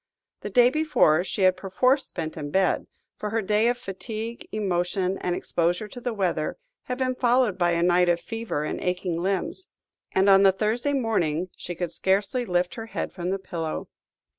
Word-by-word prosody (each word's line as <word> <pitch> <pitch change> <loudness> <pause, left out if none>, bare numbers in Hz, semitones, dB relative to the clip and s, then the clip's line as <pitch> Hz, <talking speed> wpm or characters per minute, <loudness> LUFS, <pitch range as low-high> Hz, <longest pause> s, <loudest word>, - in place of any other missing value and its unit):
The - - -6
day 245 -1 +5
before 300 - +3
she 195 +1 -2
had 185 0 +5
perforce 255 +9 +1
spent 160 -3 -5
in 145 -2 -5
bed, 190 +4 +1 0.3
for 210 - -3
her 225 +1 0
day 210 +3 +2
of 245 0 +1
fatigue, 225 +2 -6
emotion, 185 -2 -1
and 180 -1 -1
exposure 175 +6 0
to 245 - -9
the 245 - -2
weather, 185 -7 -1 0.3
had 250 - -3
been 260 -1 0
followed 245 -4 +2
by 175 -2 +2
a 170 0 +1
night 180 0 +4
of 170 0 +2
fever 225 -9 -4
and - - -3
aching 180 -2 -1
limbs; 195 - -2 0.4
and 190 +1 +3
on 195 -1 +7
the 195 -1 +7
Thursday 225 +8 0
morning 185 - 0
she 175 - -6
could 175 0 -3
scarcely 200 +6 0
lift 180 -1 +1
her 225 -1 -7
head - - -4
from 180 -1 -4
the 195 - 0
pillow. 165 -4 -5
195 Hz, 190 wpm, -25 LUFS, 175-230 Hz, 0.4 s, on